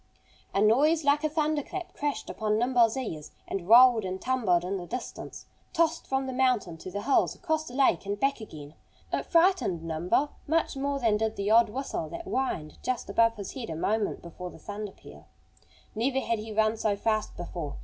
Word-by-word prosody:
A - - 0
noise 300 +9 +4
like 285 +1 +3
a 310 - +2
thunder 305 -1 0
clap 350 +5 -7
crashed 290 -1 -3
upon 215 -1 -1
Nimble's 240 0 +3
ears 160 - -5 0.2
and 190 -1 -4
rolled 240 -1 +8
and 185 0 -4
tumbled 220 -10 +1
in 195 +2 -2
the 175 -2 -7
distance, 250 +8 -7 0.3
tossed 330 0 +1
from 265 0 0
the 260 - -4
mountain 250 -9 +1
to 185 - -8
the 205 +2 -5
hills 275 - +2
across 315 -3 -2
the 245 - -8
lake, 260 -9 +2
and 205 0 -2
back 275 -1 +1
again. 150 -8 -10 0.4
It - - -1
frightened 335 - +3
Nimble 170 - 0 0.2
much 320 0 +1
more 280 +1 -1
than 225 -5 +2
did 220 0 -1
the 200 +1 -1
odd 230 0 +6
whistle 235 - -4
that 340 - -7
whined 215 - -3
just 255 -2 -3
above 230 0 +3
his 200 -2 -7
head 250 -7 -6
a 160 - -4
moment 210 +6 -1
before 180 +1 -8
the - - -13
thunder 205 0 -6
peal. 75 - -15 0.7
Never 255 +4 0
had 230 -4 -1
he 220 +1 -7
run 215 +1 +2
so 215 -2 +1
fast 215 +1 -1
before. 170 -4 -5
225 Hz, 200 wpm, -28 LUFS, 195-270 Hz, 0.7 s, rolled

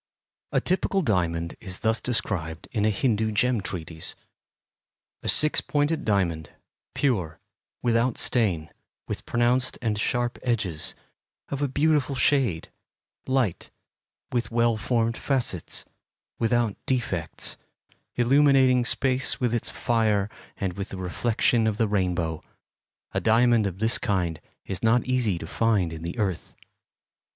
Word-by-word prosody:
A - - +3
typical 190 +1 +1
diamond 85 - 0
is 95 -3 -7
thus 110 +1 +1
described 85 -9 -2
in 105 -3 0
a - - +4
Hindu 110 0 +1
gem 120 +1 +2
treatise: 80 -4 -6 1.1
A - - -3
six 150 0 +6
pointed 150 +2 0
diamond, 85 -7 0 0.5
pure, 95 - 0 0.4
without 120 0 +2
stain, 95 -10 +1 0.4
with - - -5
pronounced 120 +1 +1
and 110 -3 -1
sharp 120 +2 -1
edges, 95 -11 -2 0.5
of 140 0 -3
a 145 - +2
beautiful 145 0 +1
shade, 120 - +1 0.6
light, 130 -9 0 0.6
with 120 -1 0
well 115 0 +2
formed 115 +1 0
facets, 125 - -2 0.5
without 120 -2 +1
defects, 105 -11 -2 0.6
illuminating 130 0 +4
space 130 +1 0
with 120 -2 0
its 120 - -1
fire 110 -3 +1 0.3
and 95 -2 -2
with 100 +1 -5
the 95 - -6
reflection 110 +5 +1
of 105 -2 0
the 115 - +2
rainbow, 90 -5 -1 0.7
a - - 0
diamond 115 -1 +4
of 95 -2 -5
this 110 +3 0
kind 90 -6 -1 0.2
is 95 - -4
not 115 +1 +3
easy 125 -8 +1
to - - -6
find 105 -7 +1
in 80 - -7
the 85 +5 -5
earth. 95 -6 -2
115 Hz, 130 wpm, -26 LUFS, 95-125 Hz, 1.1 s, six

